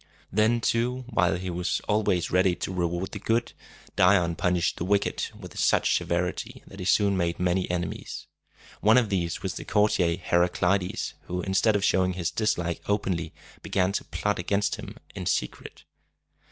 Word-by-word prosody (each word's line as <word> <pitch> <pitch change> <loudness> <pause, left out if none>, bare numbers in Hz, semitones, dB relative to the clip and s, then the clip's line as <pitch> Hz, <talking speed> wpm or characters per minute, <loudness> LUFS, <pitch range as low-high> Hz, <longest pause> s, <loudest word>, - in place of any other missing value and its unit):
Then, 110 +3 +2
too, 125 +3 0
while 90 -8 +2
he 90 0 -4
was 90 +1 -1
always 105 -5 +1
ready 90 0 +3
to 95 - -4
reward 85 +1 -2
the 105 - -6
good, 115 +4 0 0.4
Dion 90 -2 +4
punished 90 -1 0
the - - -3
wicked 100 +2 0
with - - -9
such - - +3
severity 90 +1 -2
that 95 - -13
he 90 - -5
soon 100 0 +3
made 85 -2 -1
many 90 +1 +1
enemies. 90 0 -4 0.5
One 110 +4 +5
of 120 -4 +3
these 85 -4 -2
was 95 - -2
the - - -6
courtier 100 -5 +2
Her 85 -1 +1
a 90 - +3
cli´des, 90 +1 0
who, 90 0 -3
instead 95 +3 +2
of 100 -1 +1
showing 95 -1 +2
his 90 -1 -2
dislike 85 -6 -1
openly, 95 -5 -1 0.3
began 95 0 +1
to 100 - -2
plot 105 -2 -2
against 100 +3 0
him - - -9 0.2
in 90 -3 -5
secret. 85 - -3
95 Hz, 170 wpm, -26 LUFS, 90-105 Hz, 0.5 s, One